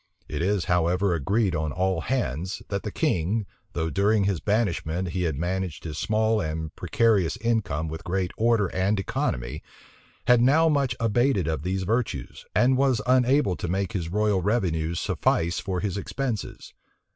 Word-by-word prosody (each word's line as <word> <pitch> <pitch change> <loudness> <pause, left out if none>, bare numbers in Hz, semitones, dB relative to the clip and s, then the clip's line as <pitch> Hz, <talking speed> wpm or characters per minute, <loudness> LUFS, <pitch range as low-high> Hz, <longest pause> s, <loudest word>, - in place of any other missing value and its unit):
It - - -4
is, 95 0 +1
however, 90 +2 +2
agreed 95 +5 +1
on 80 -1 -1
all 95 +2 0
hands, 95 - -2
that 100 -1 -2
the 105 - -4
king, 105 - 0 0.3
though 80 -1 -1
during 100 +5 +2
his 95 -4 0
banishment 95 -4 0
he 90 +2 -2
had 80 -4 0
managed 90 +2 -3
his 75 -2 -5
small 110 +1 +1
and 80 -1 -4
precarious 105 -1 +2
income 95 -10 -1
with 80 +1 -6
great 90 +1 -1
order 115 -2 +3
and 95 +2 +1
economy, 65 -9 -2 0.6
had 125 -1 +5
now 150 +6 +5
much 140 -5 +1
abated 115 - +2
of 80 -3 -1
these 95 +3 -2
virtues, 110 - -2
and 130 +1 +4
was 135 -3 +3
unable 125 -4 +3
to - - -4
make 95 +2 -1
his 85 -5 -2
royal 105 0 +1
revenues 85 -6 0
suffice 85 +2 0
for 95 -3 -3
his 100 -2 -2
expenses. 115 +2 -4
95 Hz, 160 wpm, -25 LUFS, 85-115 Hz, 0.6 s, had